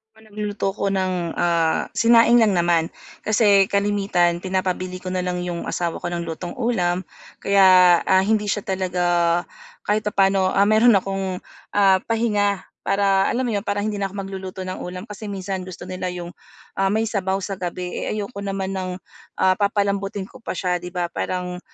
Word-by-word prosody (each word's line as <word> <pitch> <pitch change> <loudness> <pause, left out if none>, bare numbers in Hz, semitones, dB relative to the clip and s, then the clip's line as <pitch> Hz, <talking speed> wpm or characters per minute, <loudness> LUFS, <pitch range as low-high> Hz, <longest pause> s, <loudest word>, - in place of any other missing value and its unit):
Oo, 220 - -20
nagluluto 210 -2 -3
ako 200 0 -2
ng, 185 -3 -1
ah, 170 -2 +1
sinaing 235 +1 +5
lang 215 -4 +4
naman. 170 -1 +3 0.4
Kasi 205 -3 +4
kalimitan 195 -4 +1
pinapabili 185 0 -3
ko 185 - -4
na 185 - -1
lang 180 0 -2
'yung 175 -1 -4
asawa 170 -2 -2
ko - - -4
ng 175 -1 -3
lutong 170 +1 -6
ulam 190 -7 0 0.4
kaya, 185 -3 +6
ah, 190 0 +4
hindi 210 +1 +1
siya 205 0 -1
talaga 185 -2 -1 0.8
kahit 210 +1 +1
papaano, 195 -2 +2
ah, 195 - +3
meron 220 +2 +5
akong, 195 -1 -1 0.4
ah, 195 -2 +5
pahinga. 210 -4 +1 0.2
Para 195 -1 +3
alam 255 +2 0
mo 240 - -1
'yon, 205 0 -3
para 205 0 0
hindi 210 -1 -2
na 195 - 0
ako 195 - -13
magluluto 190 -1 -6
ng 185 0 -5
ulam 180 +1 -6
kasi 210 0 -9
minsan 190 -1 -4
gusto 185 - -9
nila 185 0 -5
'yung, 175 -1 -6 0.5
ah, 195 - +3
may 220 +3 +1
sabaw 195 -4 -1
sa 195 0 -5
gabi, 180 0 -4
eh, - - -2
ayoko 205 0 -5
naman 195 -1 -3
ng, 185 -1 -3 0.5
ah, 190 0 +4
papalambutin 200 -1 0
ko 260 - -15
pa - - -5
siya, 180 -2 0
'di 180 - -7
ba 175 -1 -3
parang, 180 -1 -3
195 Hz, 180 wpm, -22 LUFS, 180-205 Hz, 0.8 s, kaya